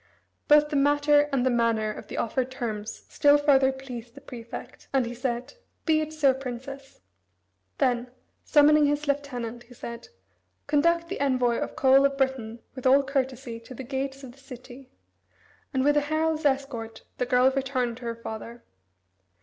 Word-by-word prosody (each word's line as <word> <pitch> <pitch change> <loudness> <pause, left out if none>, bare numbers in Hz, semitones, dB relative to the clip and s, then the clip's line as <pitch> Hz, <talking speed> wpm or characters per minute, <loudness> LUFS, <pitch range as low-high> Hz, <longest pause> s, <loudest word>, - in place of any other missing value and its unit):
Both 295 0 +6
the 300 - -3
matter 290 +1 +3
and 265 -2 +1
the 260 - +3
manner 230 -2 +1
of - - -9
the - - -7
offered 255 +2 -1
terms 220 -5 -5
still 290 0 +4
further 275 -2 +4
pleased 245 -3 -9
the 280 - -12
prefect, 235 -4 -10
and 265 -2 +2
he 235 - -5
said: 245 +1 -3 0.3
"Be 315 -2 +3
it 310 0 -4
so, 295 -4 +3
Princess." 265 - -8 0.8
Then 245 0 +1 0.3
summoning 300 0 +5
his 290 +1 -1
lieutenant, 250 -5 -3
he 245 +1 -16
said: 235 0 -8 0.6
"Conduct 335 +3 +2
the 385 - -5
envoy 250 -4 +2
of - - -4
Coel 270 +1 +5
of 275 0 +1
Britain 250 -4 -2
with 260 0 -2
all 275 +2 +6
courtesy 260 -3 -3
to 230 +3 -12
the 265 - -7
gates 270 +1 -4
of 255 - -9
the 250 - -21
the - - -21
city," 255 0 -12 0.8
and 265 -3 0
with 290 +1 +3
a 295 - +4
herald's 310 +1 -1
escort 265 -5 -2 0.2
the 250 - 0
girl 250 +1 +4
returned 260 -3 -1
to 250 - -10
her 230 0 -3
father. 230 +1 -8
265 Hz, 175 wpm, -26 LUFS, 240-285 Hz, 0.8 s, Both